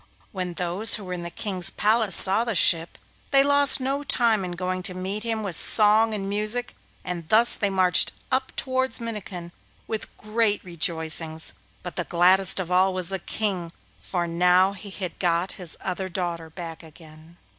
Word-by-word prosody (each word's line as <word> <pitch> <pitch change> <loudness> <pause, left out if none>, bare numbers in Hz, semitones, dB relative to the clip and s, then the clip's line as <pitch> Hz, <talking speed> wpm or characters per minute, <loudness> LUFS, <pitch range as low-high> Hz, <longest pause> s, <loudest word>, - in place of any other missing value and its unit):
When 180 -3 -5
those 180 +6 0
who 210 - -8
were 180 -1 -6
in 180 - -5
the 170 - -6
King's 185 0 -1
palace 215 0 +4
saw 195 +4 +5
the 230 -3 -3
ship, 165 -1 +2 0.3
they 275 -1 +4
lost 285 0 +5
no 270 +2 -2
time 235 -7 +1
in 180 -1 -5
going 185 +1 -3
to 180 0 -3
meet 190 +3 -4
him 225 -1 -3
with 190 -5 -2
song 215 +4 +3
and 195 -2 -4
music, 215 +4 -3 0.3
and 175 -3 -6
thus 230 +2 +7
they 200 - 0
marched 185 -2 +2 0.2
up 260 0 0
towards 260 0 -1
Minnikin 205 -7 -7 0.3
with 220 -1 -5
great 215 -1 -1
rejoicings; 160 -2 -3 0.3
but 180 - -8
the 175 - -1
gladdest 185 +3 +4
of 180 -1 -5
all 185 +1 +2
was 185 -2 0
the 190 -1 -3
King, 185 -4 -3 0.3
for 175 -2 -3
now 180 +3 +3
he 200 +1 -10
had 185 -3 -6
got 175 +1 0
his 170 -3 -3
other 190 0 -4
daughter 170 -3 -4
back 165 -1 -8
again. 160 +1 -16
185 Hz, 175 wpm, -24 LUFS, 175-215 Hz, 0.3 s, thus